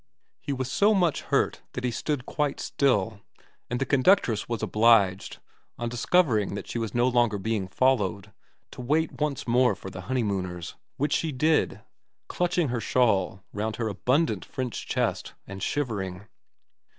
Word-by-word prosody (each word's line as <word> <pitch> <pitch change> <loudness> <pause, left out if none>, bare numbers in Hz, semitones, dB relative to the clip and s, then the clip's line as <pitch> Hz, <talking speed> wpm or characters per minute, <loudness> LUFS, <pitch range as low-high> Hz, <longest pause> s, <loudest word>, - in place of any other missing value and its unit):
He - - -5
was 130 -1 -3
so 210 +1 +4
much 175 -6 +2
hurt - - 0
that 125 - -5
he 125 - 0
stood 135 +2 -2
quite 145 -2 -1
still, 110 -6 0 0.5
and 125 - -2
the 135 - 0
conductress 130 - +3
was 115 -2 -3
obliged, 105 -4 +3 0.4
on 120 0 -3
discovering 120 - +2
that - - -6
she 120 - -3
was 110 -2 -4
no 120 +1 +3
longer 120 -4 +2
being 105 -1 -2
followed, 105 -3 0 0.4
to - - -8
wait 150 +5 0
once 145 -5 -1
more 120 -2 +3
for 95 - -9
the 95 - -7
honeymooners; 95 -8 -2 0.2
which 145 +3 0
she 160 - 0
did, 155 +4 +1 0.5
clutching 175 -3 0
her 120 -1 -2
shawl 100 -5 +1
round 110 +1 -2
her 115 -2 -2
abundant 130 - +1
French 130 -3 -5
chest - - -1
and 95 0 -8
shivering. 100 -8 -3
120 Hz, 155 wpm, -26 LUFS, 100-140 Hz, 0.5 s, so